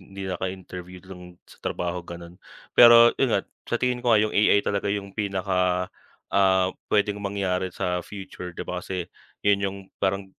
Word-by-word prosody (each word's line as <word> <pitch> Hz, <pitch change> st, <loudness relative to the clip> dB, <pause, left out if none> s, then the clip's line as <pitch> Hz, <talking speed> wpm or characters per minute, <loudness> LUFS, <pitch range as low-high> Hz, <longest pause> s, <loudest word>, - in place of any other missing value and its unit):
hindi 95 Hz, +1 st, -10 dB
naka-interview 90 Hz, -1 st, -6 dB
dun 90 Hz, -1 st, -12 dB
sa -, -, -18 dB
trabaho 90 Hz, 0 st, -3 dB
ganon. 85 Hz, +1 st, -11 dB, 0.3 s
Pero 120 Hz, 0 st, +8 dB
yun 135 Hz, -, +3 dB
nga, 100 Hz, -, +1 dB, 0.3 s
sa 120 Hz, -, +1 dB
tingin 125 Hz, 0 st, -1 dB
ko 120 Hz, -1 st, +1 dB
nga 110 Hz, -, +6 dB
yung 110 Hz, -, -1 dB
AI 105 Hz, -1 st, +4 dB
talaga 100 Hz, 0 st, -1 dB
yung 100 Hz, -1 st, -3 dB
pinaka, 95 Hz, -3 st, 0 dB, 0.5 s
ah, 95 Hz, -1 st, +3 dB, 0.2 s
pwedeng 105 Hz, 0 st, +1 dB
mangyari 95 Hz, -2 st, -1 dB
sa 90 Hz, -1 st, -2 dB
future 95 Hz, -2 st, -8 dB
'di 85 Hz, -, -8 dB
ba, 90 Hz, 0 st, -4 dB
kasi 90 Hz, -2 st, -4 dB, 0.4 s
yun 100 Hz, -1 st, +5 dB
yung 100 Hz, 0 st, -2 dB, 0.2 s
parang 95 Hz, +1 st, 0 dB
95 Hz, 165 wpm, -25 LUFS, 90-100 Hz, 0.5 s, Pero